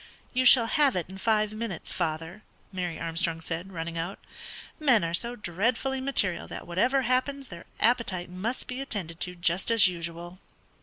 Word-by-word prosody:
"You 255 0 +1
shall 245 -1 +8
have 280 +2 +3
it 175 -3 -2
in 190 0 -9
five 215 0 +1
minutes, 215 -5 -4
father," 165 +3 -3 0.3
Mary 180 -3 -3
Armstrong 165 0 -1
said, 165 +3 -4
running 165 -1 -4
out. 175 +4 -4 0.6
"Men 255 - +4
are 165 0 -2
so 235 +7 0
dreadfully 230 +7 -1
material 235 -10 +1
that - - -7
whatever 250 +11 +1
happens 255 +2 0
their 170 -1 -10
appetite 220 -6 +1
must 215 +8 -3
be 255 +1 -5
attended 180 -11 -3
to 180 0 0
just 175 +3 +1
as 225 -4 +7
usual." 170 0 -5
190 Hz, 165 wpm, -28 LUFS, 170-240 Hz, 0.6 s, shall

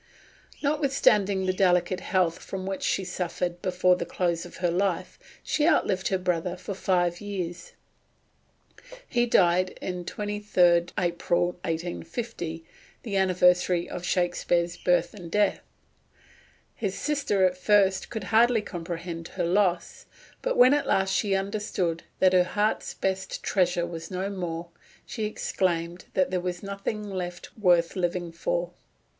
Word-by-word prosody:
Notwithstanding 265 -10 +2
the 185 - +1
delicate 185 0 +2
health 180 -3 0
from 190 -1 -6
which 195 0 -3
she 195 - 0
suffered 180 -1 -3
before 180 -1 +3
the 180 - -3
close 170 -2 -1
of - - -13
her 175 -1 0
life, 185 0 -1 0.2
she 300 0 +1
outlived 190 - +2
her 190 - +1
brother 180 0 -1
for 190 +2 -6
five 175 -2 0
years. 180 -4 -5 1.3
He 240 -1 +1
died 185 -3 +3
on 180 -1 -4
23d 185 -4 +2
April 175 0 +1
1850, 165 +1 -4 0.4
the 210 -4 -4
anniversary 180 -2 +3
of 175 - -6
Shakespeare's 175 -1 0
birth 180 -1 +1
and 180 -5 -9
death. 205 +2 +2 1.1
His 195 -3 -3
sister 280 -10 +1
at 180 0 +1
first 190 0 +2
could 220 -3 -5
hardly 230 0 +5
comprehend 170 -2 -6
her 180 -2 -3
loss; 180 -1 0 0.3
but - - -1
when 255 +2 +7
at 290 -1 +1
last 190 0 +2
she 200 -3 +1
understood 195 -4 -2 0.2
that 185 0 +4
her 180 -1 +6
heart's 210 +4 -1
best 190 0 -2
treasure 175 -3 +1
was 165 -1 -7
no 190 +1 -3
more, 170 -3 -4 0.4
she 220 - -4
exclaimed 175 -4 -2
that 185 -1 +2
there 180 -1 0
was 175 0 -4
nothing 200 +2 -4
left 180 -2 -6
worth 175 -5 +3
living 175 -1 -1
for. 170 +1 -2
185 Hz, 140 wpm, -27 LUFS, 175-200 Hz, 1.3 s, when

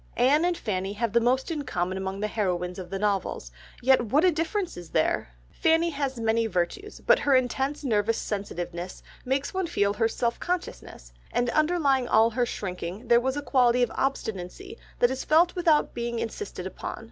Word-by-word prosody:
Anne 275 +6 +4
and 350 -1 +1
Fanny 195 -2 -2
have 220 0 -2
the 235 - +5
most 260 +6 +1
in 310 -3 -2
common 180 -6 -2
among 190 +1 -4
the 215 - 0
heroines 180 -4 -2
of 180 -2 -7
the 195 - -3
novels, 195 - -1 0.3
yet 265 0 +5
what 285 - +3
a 365 - +5
difference 335 +4 -2
is 175 -2 -9
there! - - 0 0.2
Fanny 325 +1 +2
has 275 -4 -3
many 225 0 +1
virtues, 220 - -3
but - - +5
her 280 -2 +3
intense 265 +3 0
nervous 225 -3 +1
sensitiveness 180 -3 -5 0.2
makes 270 +5 -1
one 375 -2 -1
feel 200 -11 +1
her 225 +2 +2
self 235 +1 -2
consciousness, 340 - -5 0.2
and 245 0 0
underlying 300 -5 +2
all 225 +1 +4
her 240 +1 0
shrinking 185 +2 -5
there 235 0 +6
was 265 +2 -1
a 290 - -3
quality 250 -3 +3
of 240 - 0
obstinacy 270 - -3 0.2
that 245 - +3
is 260 - -3
felt 335 +3 +4
without 330 -4 +2
being 235 0 -3
insisted 315 - -5
upon. - - -6
240 Hz, 185 wpm, -26 LUFS, 200-290 Hz, 0.3 s, there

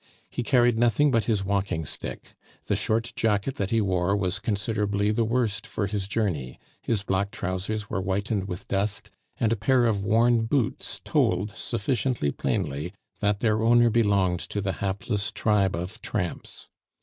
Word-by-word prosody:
He - - -2
carried 120 -2 +3
nothing 120 +5 +4
but 115 -3 +2
his 105 -4 0
walking 95 -5 -1
stick; - - -6 0.3
the 105 - +1
short 110 +3 0
jacket 110 +3 0
that 100 -1 -1
he 115 0 +2
wore 95 0 +1
was 95 -1 -1
considerably 105 -1 0
the 115 +2 +1
worst 110 -3 0
for 100 - -2
his 100 -1 -2
journey, 90 - -2 0.2
his 110 -4 -1
black 100 0 0
trousers 100 +1 -3
were 95 - -2
whitened 100 +1 -1
with 90 -2 -6
dust, 100 +1 -2 0.3
and 115 -1 +2
a - - +1
pair 125 +3 +3
of 105 -4 +1
worn 115 +2 +3
boots 125 -3 -1
told 105 +3 +1
sufficiently 120 - -1
plainly 75 +5 -2 0.3
that 105 -1 +1
their 110 -2 +2
owner 120 +1 +5
belonged 100 -6 +2
to 105 - -4
the 95 -1 -1
hapless 100 +2 -1
tribe 105 -4 +2
of 90 +2 -5
tramps. - - -4
105 Hz, 160 wpm, -26 LUFS, 95-115 Hz, 0.3 s, owner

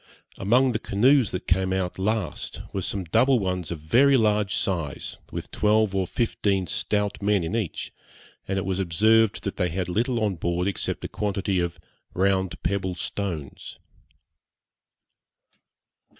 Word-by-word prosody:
Among 125 +6 +3
the 110 - -1
canoes 125 +4 +3
that 90 - -5
came 95 +1 +1
out 95 -1 -2
last 100 -4 -2
were 95 - -1
some 95 +1 -1
double 125 - +3
ones 90 -5 -2
of 85 -3 -5
very 130 - +4
large 105 -2 +2
size, 85 -9 -2
with - - -6
twelve 105 -1 +2
or 95 -2 0
fifteen 100 -4 0
stout 105 +6 -1
men 100 -2 +2
in 80 +6 -2
each, 105 -8 -3 0.5
and 95 - -1
it 95 - -1
was 95 0 -1
observed 105 +4 +3
that 100 - -4
they 90 -2 +1
had 90 +1 -2
little 115 +6 0
on 100 -4 0
board 85 +2 -1
except 100 - -2
a - - -1
quantity 100 -1 -1
of 85 -1 -2 0.4
round 95 -1 0
pebble 95 -2 -1
stones. 85 -5 -5
100 Hz, 150 wpm, -25 LUFS, 90-110 Hz, 0.5 s, very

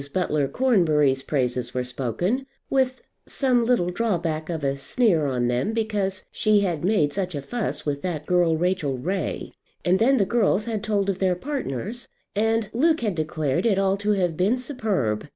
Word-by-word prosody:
Butler 150 -5 0
Cornbury's 155 - +2
praises 125 -3 -1
were 125 - 0
spoken, 135 - -2 0.2
with 260 -1 +1 0.2
some 255 -3 +2
little 230 -7 +2
drawback 170 -6 -1
of 160 -3 -3
a 135 0 +1
sneer 165 - +1
on 125 -2 0
them, 125 - 0
because 205 -4 -1
"she 215 -1 +3
had 175 -6 -1
made 180 -7 +2
such 185 -4 -2
a 145 - -3
fuss 235 +7 -3
with 145 -1 -2
that 160 -5 -3
girl 175 -2 +3
Rachel 170 -6 0
Ray;" 185 +9 -3 0.3
and 180 +2 +3
then 265 +4 +4
the 200 - +3
girls 215 -2 +2
had 220 -3 -3
told 205 -2 0
of 195 -1 -1
their 185 -2 +2
partners, 240 - -4 0.3
and 225 +1 +1
Luke 315 +5 +2
had 215 -4 0
declared 155 - -1
it 200 -4 +2
all 195 0 +2
to 205 +1 +1
have 180 -5 0
been 195 +9 +2
superb. 205 - -2
185 Hz, 175 wpm, -24 LUFS, 150-225 Hz, 0.3 s, then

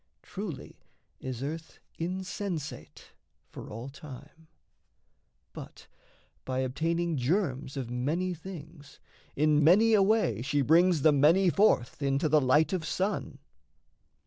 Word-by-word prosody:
Truly 190 -8 -7 0.4
is 130 -1 -6
earth 160 +3 -6 0.2
insensate 185 -2 -5 0.3
for - - -11
all 115 +4 -7
time; 145 +3 -12 1.1
But, - - -11 0.6
by 130 0 -2
obtaining 165 +5 -1
germs 140 -1 -1
of 125 -3 -4
many 160 +9 -1
things, 160 -4 -11 0.4
In 150 0 +3
many 210 +8 +5
a 210 - +5
way 195 - +2
she 140 +2 0
brings 165 +1 +4
the 155 - +6
many 165 +6 +4
forth 180 - +2
Into 140 +3 +1
the 155 0 +4
light 145 +7 +3
of 180 -4 -1
sun. 190 +6 -2
155 Hz, 120 wpm, -29 LUFS, 135-180 Hz, 1.1 s, the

